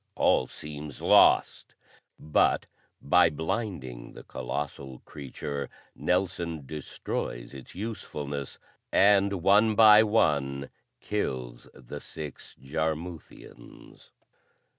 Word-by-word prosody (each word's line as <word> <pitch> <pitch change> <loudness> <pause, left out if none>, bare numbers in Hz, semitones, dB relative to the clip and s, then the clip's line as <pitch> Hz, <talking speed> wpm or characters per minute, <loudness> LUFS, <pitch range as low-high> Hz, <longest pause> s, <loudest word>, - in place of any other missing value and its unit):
All 65 - +3
seems 75 -2 -8
lost; - - +4 0.4
but 75 - +2 0.4
by 90 +3 +5
blinding 80 - -4
the - - -11
colossal 65 0 -5
creature, 70 0 -6 0.3
Nelson 85 -4 -1
destroys 65 -4 -5
its 70 +3 -11
usefulness, 75 - -5 0.3
and 100 -2 +4
one 105 +3 +5
by 110 -1 +8
one 70 -11 +1 0.3
kills 65 -12 -4
the 65 +4 -9
six 75 -4 -9
Jarmuthians. 80 +4 -6
75 Hz, 85 wpm, -28 LUFS, 70-95 Hz, 0.4 s, by